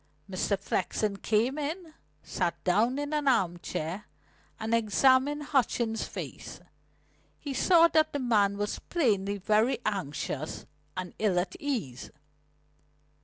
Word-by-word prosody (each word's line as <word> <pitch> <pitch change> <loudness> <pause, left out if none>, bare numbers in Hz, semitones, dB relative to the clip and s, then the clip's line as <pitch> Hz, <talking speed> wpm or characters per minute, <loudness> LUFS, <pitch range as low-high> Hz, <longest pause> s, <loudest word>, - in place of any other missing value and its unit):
Mr. 195 +1 -1
Flexen 200 +1 -1
came 230 +8 +1
in, 320 +3 -4 0.3
sat 175 -3 -2
down 220 +8 +2
in 290 +1 -3
an 295 -2 0
arm 175 -9 +2
chair, 175 +6 -4 0.5
and 220 +1 -2
examined 260 +6 +3
Hutchings' 235 -5 0
face. - - -7 0.8
He 285 - -5
saw 335 +5 +5
that 310 -1 +3
the 285 - -2
man 210 -6 +2
was 205 0 -2
plainly 205 - 0
very 215 +6 +2
anxious 155 -6 -3 0.3
and 185 -1 -4
ill 205 -4 +2
at 180 +1 -1
ease. 215 - -3
220 Hz, 120 wpm, -29 LUFS, 195-280 Hz, 0.8 s, saw